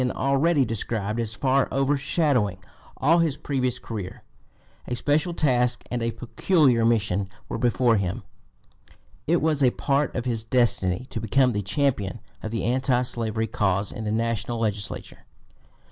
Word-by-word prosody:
243) 125 +1 -1
already 145 0 +3
described 110 -1 -3
as 115 -1 -3
far 135 0 +2
overshadowing 135 - +1 0.4
all 160 +6 +4
his 160 -4 +1
previous 130 -3 -1
career. 105 -5 -7 0.6
A 125 - -2
special 150 +7 +1
task 125 -6 +1
and 120 -1 -1
a 115 - 0
peculiar 135 -1 +2
mission 100 -4 +1 0.2
were - - -4
before 120 -1 +3
him. 100 +4 -2 1.0
It 170 +1 +2
was 155 -2 +1
a 130 - +6
part 140 +2 0
of 125 - -2
his 115 -3 -1
destiny 110 -3 +1
to 110 - -4
become 125 +4 +3
the 105 -2 -1
champion 100 -1 -1 0.2
of 110 - -4
the 115 +1 -3
anti 125 +1 +1
slavery 115 -2 -1
cause 100 -2 0
in 110 - -6
the 105 - -2
national 115 +1 -1
legislature. 105 -3 -3
120 Hz, 150 wpm, -25 LUFS, 110-135 Hz, 1.0 s, a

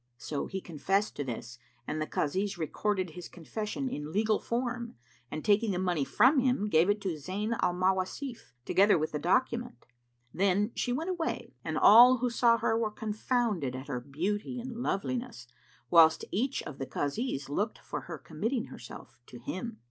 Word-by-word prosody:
'" 120 - -46
So 145 +3 -4
he 190 0 -4
confessed 190 +6 -1
to 145 - -1
this 125 -1 -6 0.3
and 155 +5 -3
the 155 - -1
Kazis 190 +6 -1
recorded 185 +2 -1
his 175 +2 -8
confession 210 - -4
in 150 - -5
legal 215 +2 +2
form 240 0 -3 0.3
and 155 - -5
taking 210 +2 +3
the - - -1
money 180 -5 0
from 255 - +4
him, 250 -5 +1
gave 165 +1 +4
it 205 +1 +2
to 190 -3 -1
Zayn 200 +9 -2
al 175 - +2
Mawasif, 190 - -1
together 200 -1 +4
with 155 0 -1
the 150 - -2
document. 240 - 0 0.5
Then 200 +4 +2
she 245 - -1
went 320 +9 -1
away 340 -3 -3
and - - -2
all 245 +4 +8
who 245 0 -1
saw 235 0 +4
her 225 0 +1
were 225 -1 +1
confounded 215 - -1
at 130 +3 -7
her 125 -3 -2
beauty 190 - -3
and 245 0 -6
loveliness, 240 - -3 0.5
whilst 160 -1 +6
each 260 +7 -1
of 150 -3 -8
the 135 - -4
Kazis 145 - -2
looked 205 +10 -1
for - - -6
her 170 -2 -7
committing 225 - -3
herself 120 0 -11
to 125 - -10
him. 200 - -5
200 Hz, 180 wpm, -30 LUFS, 155-235 Hz, 0.5 s, all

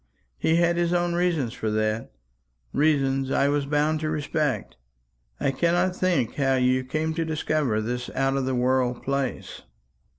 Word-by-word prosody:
He 160 - +2
had 170 0 +2
his 175 0 +1
own 175 0 +1
reasons 170 -9 0
for 110 -3 -3
that 110 +1 -1 0.6
reasons 135 -3 +2
I 140 +1 +2
was 145 -1 0
bound 150 +2 +1
to 155 0 -2
respect. 150 -2 -2 0.6
I 135 - +1
cannot 175 +5 +1
think 175 -12 0
how 135 -2 +2
you 130 0 +2
came 155 +5 -2
to 165 +1 -1
discover 155 -7 0
this 125 +2 -3
out 135 0 +1
of 135 -1 0
the 130 0 -1
world 125 0 +1
place." 140 -1 -3
140 Hz, 160 wpm, -25 LUFS, 130-160 Hz, 0.6 s, He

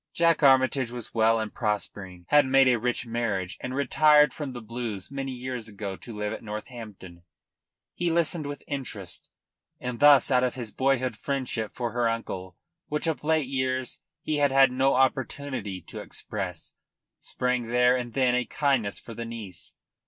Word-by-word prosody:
Jack 170 -1 +3
Armytage 130 -2 +4
was 120 -2 -7
well 115 0 +3
and 110 -1 -4
prospering, 100 -5 -3
had 145 -2 +5
made 135 0 +5
a 125 -2 +4
rich 125 +1 -1
marriage 110 -6 -2
and 130 0 -4
retired 150 +1 +5
from 145 -3 -5
the 125 - -7
Blues 115 -3 -5
many 135 -1 -4
years 125 -2 -5
ago 100 -2 -5
to 115 +2 -10
live 105 0 -2
at - - -6
Northampton. 105 -5 -8 0.7
He 175 - -1
listened 165 -2 +1
with 145 0 -6
interest, 110 -10 -5 0.5
and 125 -1 -4
thus 145 -2 +7
out 125 -1 +4
of 125 -1 0
his 120 -5 -6
boyhood 130 -1 +1
friendship 130 -6 -3
for 120 -2 -2
her 120 -1 +1
uncle, 95 -6 -5 0.3
which 150 +2 -2
of 160 -2 -1
late 160 -1 +2
years 130 -1 -2 0.2
he 155 - -1
had 145 -1 +3
had 135 -1 +6
no 135 +2 +2
opportunity 130 -6 -1
to 80 - -9
express, - - -5 0.5
sprang 125 -2 -1
there 125 +1 +4
and 120 -2 -4
then 130 -2 +3
a 125 0 +2
kindness 130 -5 0
for 115 - -10
the 115 - -5
niece. 110 -6 -8
125 Hz, 170 wpm, -27 LUFS, 110-135 Hz, 0.7 s, thus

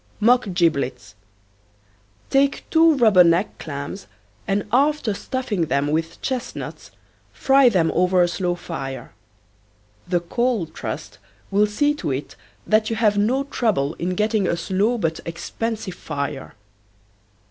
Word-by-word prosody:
MOCK 235 -1 +3
GIBLETS. 140 - 0 1.2
Take 275 +1 +2
two 325 -1 +5
rubber 215 -7 +6
neck 170 +4 +1
clams 145 +5 -6 0.4
and 195 +1 0
after 275 -2 +2
stuffing 205 -6 -2
them 140 +2 0
with 160 +2 -2
chestnuts 260 -3 -5 0.4
fry 270 -1 +4
them 170 -7 +2
over 180 0 +3
a - - +3
slow 175 0 -1
fire. 135 -6 -6 1.0
The 175 -1 +1
Coal 235 +2 0
Trust 160 - -7 0.3
will 205 +2 +3
see 290 +8 +1
to 295 - -4
it 135 +1 -4 0.3
that 215 0 +2
you 225 - -1
have 215 -2 +2
no 250 +7 +1
trouble 210 - 0
in 180 +1 -2
getting 210 -1 +1
a 170 - 0
slow 195 +7 0
but 165 -6 -1
expensive 215 +4 -4
fire. 140 -4 -5
195 Hz, 130 wpm, -22 LUFS, 165-235 Hz, 1.2 s, rubber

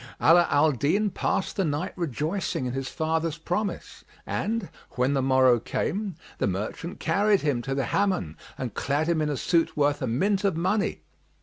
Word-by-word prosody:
Ala 170 +1 +6
al 150 +2 +4
Din 175 - +1
passed 190 - -1
the 195 - +2
night 150 -3 -2
rejoicing 160 - -2
in 125 - -3
his 135 -1 -3
father's 160 0 -1
promise 180 +5 -3 0.2
and, 220 -2 -2 0.2
when 125 +3 +1
the 135 - +1
morrow 130 -2 +4
came, 195 - -2 0.2
the - - +1
merchant 105 - -4
carried 205 0 +2
him 145 -5 0
to 135 +2 -3
the 135 - 0
Hammam 185 - 0 0.2
and 125 -5 -4
clad 145 +3 0
him 170 -2 +1
in 150 - 0
a 145 - -1
suit 165 +1 +1
worth 145 0 +2
a - - -1
mint 190 - +1
of 195 -5 +1
money. 190 +5 0
155 Hz, 180 wpm, -26 LUFS, 135-190 Hz, 0.2 s, Ala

